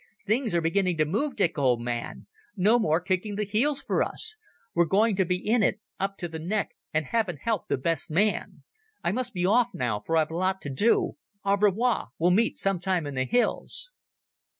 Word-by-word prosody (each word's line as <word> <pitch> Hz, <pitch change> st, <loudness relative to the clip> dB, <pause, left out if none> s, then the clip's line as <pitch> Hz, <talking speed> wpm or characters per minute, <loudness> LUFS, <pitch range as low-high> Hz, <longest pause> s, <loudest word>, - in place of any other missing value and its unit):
Things 220 Hz, -1 st, 0 dB
are 170 Hz, -, +3 dB
beginning 180 Hz, +1 st, +1 dB
to 155 Hz, -, +3 dB
move, 235 Hz, -, -1 dB
Dick, 165 Hz, -3 st, +1 dB
old 125 Hz, -4 st, +3 dB
man. 120 Hz, 0 st, -4 dB, 0.3 s
No 215 Hz, +6 st, +4 dB
more 160 Hz, -6 st, +2 dB
kicking 185 Hz, +3 st, -2 dB
the 210 Hz, -, -1 dB
heels 240 Hz, +8 st, 0 dB
for -, -, 0 dB
us. 435 Hz, -, +1 dB, 0.4 s
We're 170 Hz, 0 st, +3 dB
going 210 Hz, +5 st, +3 dB
to 190 Hz, -, +3 dB
be 180 Hz, +1 st, +1 dB
in 220 Hz, +6 st, +1 dB
it 215 Hz, -, +1 dB, 0.2 s
up 195 Hz, +1 st, -2 dB
to 175 Hz, -, -4 dB
the 160 Hz, -1 st, -7 dB
neck, 195 Hz, +6 st, -1 dB, 0.2 s
and 155 Hz, 0 st, 0 dB
Heaven 195 Hz, -1 st, -1 dB
help 220 Hz, +2 st, -2 dB
the -, -, 0 dB
best 165 Hz, +3 st, -1 dB
man... 200 Hz, +7 st, 0 dB, 0.4 s
I 175 Hz, -, +1 dB
must 250 Hz, +3 st, -2 dB
be 180 Hz, -4 st, -1 dB
off 240 Hz, +5 st, +3 dB
now, 115 Hz, -5 st, -1 dB
for 165 Hz, +11 st, -1 dB
I've 155 Hz, 0 st, +1 dB
a -, -, -4 dB
lot 190 Hz, +2 st, 0 dB
to 140 Hz, -, -5 dB
do. 205 Hz, -, +2 dB, 0.3 s
Au 200 Hz, 0 st, +4 dB
revoir. 210 Hz, +4 st, +2 dB
We 175 Hz, +2 st, +3 dB
meet 225 Hz, +5 st, +2 dB
some 195 Hz, -2 st, 0 dB
time 180 Hz, -3 st, 0 dB
in 145 Hz, -, -5 dB
the 130 Hz, -1 st, 0 dB
hills." -, -, -1 dB
190 Hz, 210 wpm, -27 LUFS, 165-220 Hz, 0.4 s, No